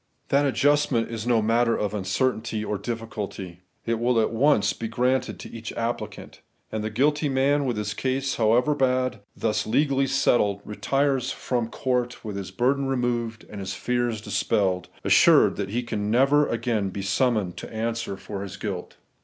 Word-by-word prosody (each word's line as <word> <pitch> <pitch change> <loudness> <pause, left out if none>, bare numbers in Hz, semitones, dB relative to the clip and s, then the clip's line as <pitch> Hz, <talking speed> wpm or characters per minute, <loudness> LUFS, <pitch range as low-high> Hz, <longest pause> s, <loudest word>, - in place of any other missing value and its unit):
That 140 +1 +3
adjustment 135 -2 +2
is 115 0 -4
no 115 -3 +3
matter 115 +1 +2
of 105 -2 -1
uncer 105 +6 +1
tainty 110 -2 -4
or 105 - -2
difBculty; 105 -5 -5 0.3
it 115 -1 0
will 120 0 +2
at 110 - +1
once 115 -5 +3
be 115 - -5
granted 125 +3 0
to - - -8
each 115 -1 -7
applicant; 115 +1 -5 0.3
and 110 -1 -3
the 110 - -2
guilty 145 +6 +1
man 140 +2 +2
with 120 -4 -1
his 105 -1 -2
case, 135 +1 -1
however 120 +6 +3
bad, 130 -4 +1 0.2
thus 110 -1 0
legally 135 +3 +2
settled, 100 -6 +2
retires 135 +3 0
from 120 -3 -2
court 125 -1 -2
with 105 -2 -4
his 100 -2 -5
burden 135 +3 +1
removed 120 -3 -1
and 105 - -8
his 95 -1 -4
fears 120 -3 -1
dispeUed, 100 -3 0 0.2
assured - - +5
that 100 -2 -3
he 120 +4 -1
can 105 -3 -3
never 140 +5 +4
again 115 -4 -1
be 100 +1 -5
summoned 105 -3 +1
to - - -8
answer 115 -2 -3
for 100 0 -6
his 100 -1 -7
guilt. 95 -3 -5
115 Hz, 170 wpm, -25 LUFS, 105-130 Hz, 0.3 s, assured